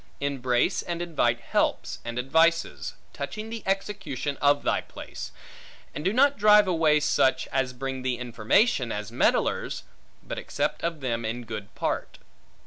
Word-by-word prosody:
Embrace 130 -3 +1
and 170 -1 -4
invite 140 -9 +1
helps, - - 0
and 120 +1 -5
advices, 160 +6 +2 0.2
touching 215 0 -5
the 230 -1 -5
execution 190 -8 -2
of 145 0 +4
thy - - +1
place; - - -8 0.6
and 150 - -5
do 190 - +2
not 280 +3 +4
drive 210 -1 +7
away 160 -4 +3
such, 135 -3 +2
as 130 -1 0
bring 135 +1 -4
thee 130 -1 -1
information, 120 - +2
as 105 -1 -4
meddlers; - - +1 0.4
but - - -5
accept - - -2
of 165 -3 -2
them 120 -3 -1
in 115 +2 -3
good 110 -3 -7
part. - - -2
140 Hz, 145 wpm, -26 LUFS, 125-175 Hz, 0.6 s, drive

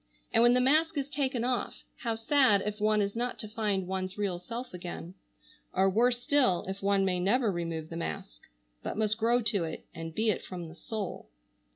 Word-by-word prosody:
And - - +5
when 240 +1 +6
the - - +4
mask 310 +5 +3
is 275 -1 -1
taken 265 -4 0
off 250 0 -2
how 230 -2 -2
sad 225 -3 +4
if 210 0 -3
one 215 0 +3
is 200 +1 -3
not 245 +1 -2
to 215 - -4
find 210 -4 -1
one's 185 +1 -3
real 195 -4 -1
self 235 +6 -6
again: 175 -1 -7 0.6
or 190 +1 +4
worse 245 +4 +2
still 255 -12 +3
if 195 +1 -5
one 195 0 +3
may 180 -1 +1
never 215 +5 +2
remove 165 -3 -3
the 165 - -5
mask, - - -5 0.4
but - - -4
must 215 0 +1
grow 235 +2 +3
to 215 -5 +1
it 160 -1 -5
and 165 0 -7
be 220 0 +3
it - - -3
from 175 -3 -7
the 160 - -12
soul. 200 - -5
210 Hz, 205 wpm, -30 LUFS, 180-240 Hz, 0.6 s, when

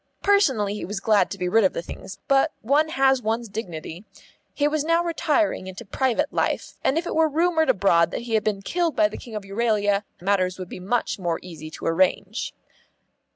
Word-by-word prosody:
Personally 270 - +3
he 210 - -5
was 205 +1 -4
glad 210 0 +3
to 200 - -6
be 180 -1 -2
rid 225 +5 +4
of 190 - +3
the - - -4
things, 190 - -9
but 275 +3 +3
one 290 +7 +2
has 270 -3 +3
one's 225 +1 -1
dignity. 180 -4 -6 0.5
He 290 - +1
was 300 0 0
now 330 +2 +2
retiring 320 - 0
into 190 +5 -8
private 265 +7 0
life, - - -1
and 275 - +2
if 335 - -1
it - - -3
were 320 0 +3
rumoured 320 +1 +2
abroad 170 -4 +4
that - - -4
he 235 -1 -5
had 220 -2 +2
been 200 -2 -1
killed 340 - 0
by 320 -1 +4
the - - -8
King 230 -3 -10
of 210 - -4
Euralia 205 -1 +1 0.2
matters 185 -1 +1
would 185 -1 -7
be - - -7
much 205 +4 -1
more 170 -3 -1
easy 160 -3 -9
to - - -9
arrange. 180 +3 +1
220 Hz, 205 wpm, -24 LUFS, 190-295 Hz, 0.5 s, rid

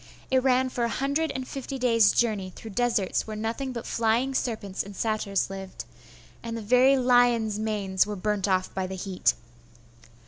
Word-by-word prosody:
It 260 0 +4
ran 260 0 +2
for 245 -1 -2
a 235 - +1
hundred 280 +6 0
and 260 -1 -4
fifty 270 0 -5
days' 230 -5 +4
journey 210 -6 0
through 220 - -9
deserts 230 -3 0
where 215 - -5
nothing 225 +5 -3
but 235 -2 -6
flying 230 +4 +1
serpents 220 -7 -2
and 200 0 -8
satyrs 205 -3 -1
lived, 195 -1 -7 0.6
and 230 0 -5
the - - -5
very 250 +5 +5
lions' 245 -4 +3
manes 205 -3 0
were 210 - -4
burnt 205 +1 -1
off 185 -1 0
by 190 -1 -2
the 190 - -6
heat.... 190 -1 0
225 Hz, 175 wpm, -26 LUFS, 200-250 Hz, 0.6 s, very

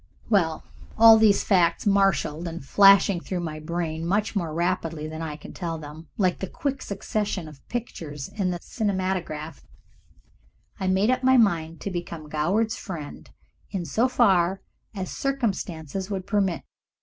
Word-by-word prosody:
With 165 -6 +2 0.3
all 225 0 +9
these 215 -2 +4
facts 175 -4 +2
marshalled 195 -5 +2
and 165 -4 -7
flashing 195 +3 +6
through 180 +1 -4
my 155 -2 -5
brain 160 0 -3
much 205 +6 0
more 170 -5 -1
rapidly 165 -2 -1
than 160 +1 -6
I 155 -2 -4
can 150 - -11
tell 165 -3 -4
them, 155 +1 -10
like 185 -3 +1
the 190 - -3
quick 275 +6 -3
succession 200 -3 -3
of 150 -3 -13
pictures 155 - -5
in 195 -3 -2
the 180 - -2
cinematograph, 185 -7 -3 1.2
I 190 - -1
made 190 +5 +3
up 255 0 0
my 260 0 +5
mind 165 -8 +1
to 200 - -4
become 170 -3 -6
Goward's 195 +10 0
friend 160 -7 -8 0.4
in 190 -4 -3
so 225 - +2
far 195 -7 +3 0.3
as 185 -2 -4
circumstances 195 - -3
would 190 -2 -3
permit. 195 -6 0
185 Hz, 150 wpm, -25 LUFS, 160-205 Hz, 1.2 s, all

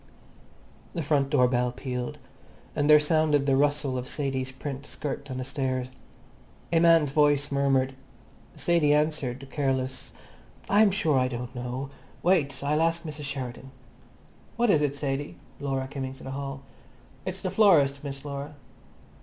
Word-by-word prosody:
The 165 - -1
front 140 -2 +1
door 130 -4 +4
bell 125 0 +1
pealed, 125 -1 -4 0.6
and 145 0 +1
there 150 0 +9
sounded 150 -2 +2
the 135 -1 +3
rustle 145 -2 +1
of 125 - -6
Sadie's 135 -3 -1
print 135 +1 -6
skirt 145 -1 -5
on 130 - -4
the 130 - -3
stairs. 130 -1 -2 0.8
A 165 - +5
man's 165 -4 +5
voice 145 -1 +3
murmured; 135 -1 +2 0.6
Sadie 160 -4 +3
answered, 140 -4 -1
careless, 130 -3 -2 0.6
"I'm 210 +1 +5
sure 165 -8 +2
I 130 - +2
don't 125 0 -5
know. 125 +2 -5 0.3
Wait. 145 -7 +2
I'll 150 +2 +1
ask 165 0 +1
Mrs 150 -2 -6
Sheridan." 130 -2 -5 0.9
"What 235 -1 +3
is 150 - +4
it, 145 -1 0
Sadie?" 140 0 -3 0.2
Laura 135 -2 -2
came 135 -1 -4
into 130 0 -8
the 135 - -6
hall. 135 0 -5 0.6
"It's - - -5
the - - -1
florist, 145 -10 +4
Miss 140 0 -6
Laura." 140 +1 -6
140 Hz, 150 wpm, -27 LUFS, 130-150 Hz, 0.9 s, there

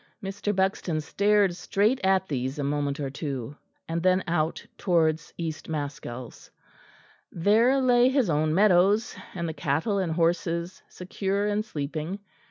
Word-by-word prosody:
Mr. 200 +1 -3
Buxton 190 -4 0
stared 200 +3 +2
straight 205 +7 +1
at 190 0 +2
these 130 0 -3
a 145 - -2
moment 145 +1 -1
or 140 -2 -3
two, 135 -2 -5 0.3
and 165 +1 -2
then 185 +1 +3
out 165 -2 -1
towards 165 -3 +1
East 165 -2 -5
Maskells. 140 -5 -6 0.8
There 225 +9 +3
lay 250 -1 +4
his 265 -4 +2
own 155 -1 +1
meadows, 200 +4 +3 0.2
and 170 -2 -2
the 160 - -3
cattle 160 +9 0
and 180 -4 -1
horses 170 +1 0
secure 195 +2 -2
and 210 0 0
sleeping. 155 -1 -4
175 Hz, 140 wpm, -26 LUFS, 155-200 Hz, 0.8 s, lay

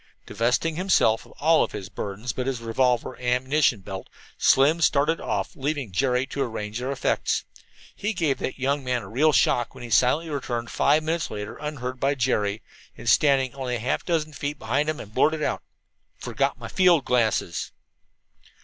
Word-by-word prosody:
Divesting 125 +8 0
himself 175 - +2
of - - -17
all 160 +2 +3
his 95 - -7
burdens 100 +4 -5
but 130 0 -3
his 130 -3 -1
revolver 120 +2 0
and - - -14 0.2
ammunition 135 -6 +2
belt, 95 0 -7 0.3
Slim 150 +5 +4
started 150 +1 +2
off. - - -3
Leaving 140 -5 -3
Jerry 125 +5 +1
to 140 +1 -5
arrange 110 -3 -3
their 130 +2 -3
effects, 140 - 0 0.5
he 205 - -2
gave 160 -9 0
that - - -4
young 140 +1 0
man 125 -3 -1
a - - -9
real 145 +9 +3
shock 120 -4 +2
when 130 - -10
he 120 - -8
silently 130 +10 +3
returned 120 -4 -3
five 150 +2 +3
minutes 165 0 -1
later 105 0 -6
unheard 130 -4 -5
by 140 +2 +1
Jerry, 115 -4 0 0.3
and, 120 - -10
standing 135 +2 +4
only 130 -3 -3
half 120 +4 -1
a - - -26
dozen 155 -3 -1
feet 145 +1 -4
behind 140 +6 0
him, 155 - -2
blurted 155 +8 +1
out: - - -1 0.6
"Forgot - - -1
my - - -8
field 180 -6 +3
glasses." 110 -8 0
130 Hz, 175 wpm, -25 LUFS, 115-150 Hz, 0.6 s, Slim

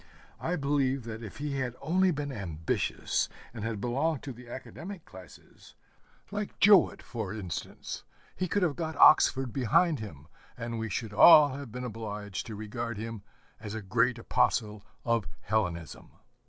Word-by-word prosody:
I 175 - -1
believe 140 -3 +1
that 115 0 -7
if 110 - -8
he 145 -1 -3
had 125 -2 -2
only 185 +6 +2
been 145 -4 -2
ambitious, 85 - -1 0.2
and 110 -3 -6
had 115 -2 -2
belonged 135 +7 0
to 135 - -5
the 120 0 -13
academic 165 +8 -8
classes, 95 -3 -15 0.6
like 205 0 -4
Jowett 205 -2 +6
for 110 -6 -5
instance, 95 -7 -6 0.3
he 185 - -1
could 200 +3 +1
have 160 -5 +1
got 160 -2 -3
Oxford 135 -5 +6
behind 150 +5 +3
him, 75 -10 -9 0.3
and 115 0 -4
we 115 0 -3
should 105 +2 -3
all 150 +6 +9
have 140 -3 -7
been 125 +2 -5
obliged 105 -4 -5
to 110 - -6
regard 115 +2 -4
him 115 -1 -5 0.4
as 105 -1 -6
a 110 - -4
great 115 +5 +2
apostle 105 -2 0 0.2
of 115 -4 +1
Hellenism. 90 -6 -2
120 Hz, 155 wpm, -29 LUFS, 105-145 Hz, 0.6 s, all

